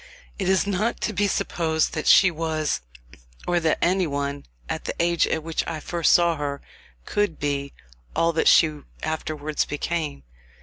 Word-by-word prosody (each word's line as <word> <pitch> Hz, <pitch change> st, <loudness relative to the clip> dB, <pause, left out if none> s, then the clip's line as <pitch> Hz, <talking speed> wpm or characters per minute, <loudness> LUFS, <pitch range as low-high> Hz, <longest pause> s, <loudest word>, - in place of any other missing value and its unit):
It -, -, 0 dB
is 190 Hz, 0 st, +3 dB
not 205 Hz, +3 st, -1 dB
to 215 Hz, -, -1 dB
be 205 Hz, +2 st, +1 dB
supposed 160 Hz, -4 st, 0 dB
that 155 Hz, -, -3 dB
she 190 Hz, -1 st, +7 dB
was, 160 Hz, -, -1 dB, 0.6 s
or 175 Hz, 0 st, +2 dB
that 160 Hz, -2 st, +1 dB
any 185 Hz, +1 st, +2 dB
one, 140 Hz, 0 st, -3 dB, 0.2 s
at -, -, -4 dB
the -, -, -3 dB
age 170 Hz, 0 st, +2 dB
at 160 Hz, -, -1 dB
which 165 Hz, 0 st, -2 dB
I 165 Hz, -2 st, -3 dB
first 170 Hz, +1 st, +1 dB
saw 170 Hz, -2 st, +4 dB
her, 140 Hz, -1 st, -3 dB, 0.5 s
could 205 Hz, -6 st, 0 dB
be, 140 Hz, -1 st, -2 dB, 0.4 s
all 165 Hz, 0 st, +2 dB
that 160 Hz, -, +1 dB
she 155 Hz, -2 st, +5 dB, 0.2 s
afterwards 155 Hz, -1 st, -2 dB
became. 150 Hz, -, -3 dB
160 Hz, 165 wpm, -24 LUFS, 150-175 Hz, 0.6 s, she